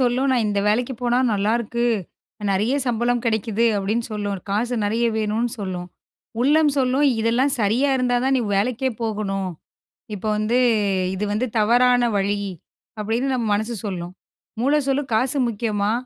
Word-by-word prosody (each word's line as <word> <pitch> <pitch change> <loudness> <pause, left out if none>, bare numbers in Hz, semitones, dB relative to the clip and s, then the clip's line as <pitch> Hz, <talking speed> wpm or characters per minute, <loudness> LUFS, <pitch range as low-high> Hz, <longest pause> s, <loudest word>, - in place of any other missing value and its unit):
சொல்லும் 255 +2 +2
நான் 245 -3 +2
இந்த 200 -1 0
வேலைக்குப் 240 +3 0
போனா 245 0 +2
நல்லா 205 +1 +1
இருக்கு. 235 +1 -2 0.7
நெறைய 210 +7 +1
சம்பளம் 240 0 0
கிடைக்குது 220 0 0
அப்படின்னு 210 +4 -1
சொல்லும். 205 -2 -3
காசு 235 +5 0
நெறைய 225 +3 0
வேணும்னு 220 +3 0
சொல்லும். 180 -3 -4 0.5
உள்ளம் 295 +3 +4
சொல்லும் 265 +2 +2
இதெல்லாம் 240 +5 +2
சரியா 230 +7 +2
இருந்தாதான் 255 +1 +1
நீ - - +1 0.2
வேலைக்கே 250 +5 0
போகணும். 200 -4 -2 0.7
இப்ப 200 - -8
வந்து 220 +4 +1 0.6
இது 195 - -3
வந்து 235 +5 0
தவறான 245 +3 +4 0.2
வழி 200 +1 0 0.6
அப்படின்னு 225 +5 -1
நம்ம 240 -3 -1
மனசு 220 +3 -2
சொல்லும். 180 -3 -5 0.5
மூளை 285 +4 +3
சொல்லும் 270 -2 -1
காசு 260 +5 +1
முக்கியமா 210 -2 -1
230 Hz, 140 wpm, -22 LUFS, 210-250 Hz, 0.7 s, உள்ளம்